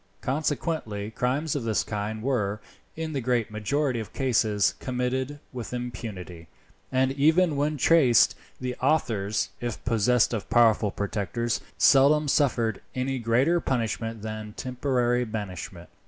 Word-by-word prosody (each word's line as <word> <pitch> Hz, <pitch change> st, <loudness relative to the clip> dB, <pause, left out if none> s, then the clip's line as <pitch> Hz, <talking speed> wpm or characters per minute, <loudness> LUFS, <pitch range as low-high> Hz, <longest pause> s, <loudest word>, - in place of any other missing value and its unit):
Consequently 135 Hz, -7 st, -2 dB
crimes 135 Hz, +7 st, -1 dB
of 145 Hz, -, -1 dB
this 110 Hz, -2 st, +1 dB
kind 110 Hz, +1 st, -4 dB
were, 105 Hz, -6 st, 0 dB, 0.4 s
in 160 Hz, -1 st, -4 dB
the 135 Hz, -, -1 dB
great 120 Hz, -2 st, 0 dB
majority 125 Hz, +4 st, -1 dB
of 110 Hz, -, -7 dB
cases, 110 Hz, -6 st, +2 dB
committed 130 Hz, +3 st, -2 dB
with 125 Hz, 0 st, -5 dB
impunity, 105 Hz, -9 st, -6 dB, 0.4 s
and 130 Hz, 0 st, +2 dB
even 160 Hz, +4 st, +3 dB
when 150 Hz, +2 st, 0 dB
traced, 135 Hz, -4 st, +5 dB, 0.3 s
the 125 Hz, -1 st, -3 dB
authors, 110 Hz, -8 st, +1 dB
if 120 Hz, -2 st, -5 dB
possessed 120 Hz, +1 st, +3 dB
of 110 Hz, -4 st, -4 dB
powerful 115 Hz, -2 st, +4 dB
protectors, 110 Hz, +4 st, -2 dB, 0.2 s
seldom 145 Hz, +2 st, +5 dB
suffered 120 Hz, -7 st, +1 dB
any 130 Hz, +1 st, -1 dB
greater 125 Hz, +9 st, +2 dB
punishment 115 Hz, -5 st, -2 dB
than 110 Hz, -1 st, -6 dB
temporary 125 Hz, -1 st, 0 dB
banishment. 95 Hz, -6 st, -6 dB
120 Hz, 125 wpm, -26 LUFS, 110-135 Hz, 0.4 s, traced